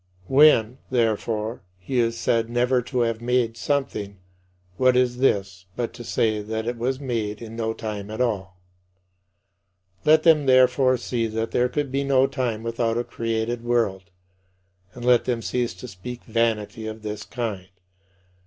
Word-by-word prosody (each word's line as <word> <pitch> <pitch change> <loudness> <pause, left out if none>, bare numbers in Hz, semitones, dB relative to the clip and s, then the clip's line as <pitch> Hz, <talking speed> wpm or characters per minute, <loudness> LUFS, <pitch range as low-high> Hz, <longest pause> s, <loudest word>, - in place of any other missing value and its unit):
When, 130 -2 +5
therefore, 115 -1 -1 0.2
he 120 +8 -2
is 115 -1 +1
said 115 0 +1
"never 125 +1 +2
to 125 +1 -2
have 115 -1 0
made" 120 -1 +1
something 115 -7 -2 0.6
what 130 +1 +4
is 125 -1 +2
this 100 -7 0
but 120 -1 -3
to 120 0 -9
say 110 -2 0
that 110 +1 -4
it 120 +1 -2
was 130 +3 -1
made 115 -6 -3
in 115 -1 -9
no 110 -1 -1
time 105 -3 -5
at 110 - -6
all? 95 -7 -1 1.5
Let 155 +1 +5
them 155 -4 +5
therefore 130 0 +5
see 120 -1 -2
that 110 +1 -3
there 125 +1 +2
could 145 0 -2
be 140 +1 0
no 135 -1 +4
time 125 -5 -2
without 115 0 -1
a 120 - 0
created 115 0 -3
world, 105 -7 0 0.9
and 120 -1 -7
let 125 -1 +4
them 120 -2 -1
cease 120 -7 -1
to 90 - -9
speak 120 +7 -8
vanity 110 -1 -1
of 110 0 -7
this 105 -1 -4
kind. 105 -4 -5
115 Hz, 160 wpm, -24 LUFS, 110-125 Hz, 1.5 s, When